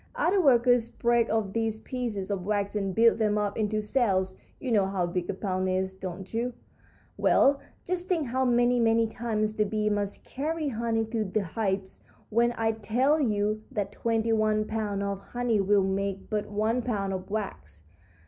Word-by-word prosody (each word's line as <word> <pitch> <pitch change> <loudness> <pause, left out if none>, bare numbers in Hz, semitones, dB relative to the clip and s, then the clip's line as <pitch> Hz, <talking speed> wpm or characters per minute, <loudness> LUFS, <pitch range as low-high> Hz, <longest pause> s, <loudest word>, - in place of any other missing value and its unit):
Other 395 -5 +2
workers 245 -5 +4
break 235 0 +1
off 215 -3 0
these 225 -1 -1
pieces 220 -6 -4
of 195 -3 -2
wax 205 +1 -1
and 195 -3 -1
build 230 0 +5
them 210 -1 +2
up 205 -1 -1
into 215 -1 -1
cells. 195 -5 +1 0.2
You 255 - -3
know 200 -4 +3
how 190 -2 0
big 175 0 -3
a - - 0
pound 185 -1 -1
is, 190 0 0
don't 190 +1 -7
you? 240 +2 -1 0.6
Well, 275 0 +4 0.3
just 360 0 -2
think 335 -5 +1
how 260 +2 0
many, 245 0 +3
many 225 0 +3
times 220 -1 -2
the 215 - +2
bees 210 0 0
must 205 -1 -2
carry 310 +3 -3
honey 225 -2 -1
to 220 0 -2
the 210 +1 -1
hives 190 0 -3 0.3
when 235 +2 +3
I 225 0 +2
tell 240 +8 +1
you 215 -4 0
that 205 -2 -3
twenty 225 +1 0
one 215 -1 +2
pounds 210 -2 -2
of 200 -1 -2
honey 240 -1 -1
will 200 0 +3
make 195 +1 -2
but 210 -1 -1
one 215 +4 0
pound 200 -5 -2
of 185 +1 -5
wax. 190 - -5
215 Hz, 180 wpm, -28 LUFS, 200-235 Hz, 0.6 s, build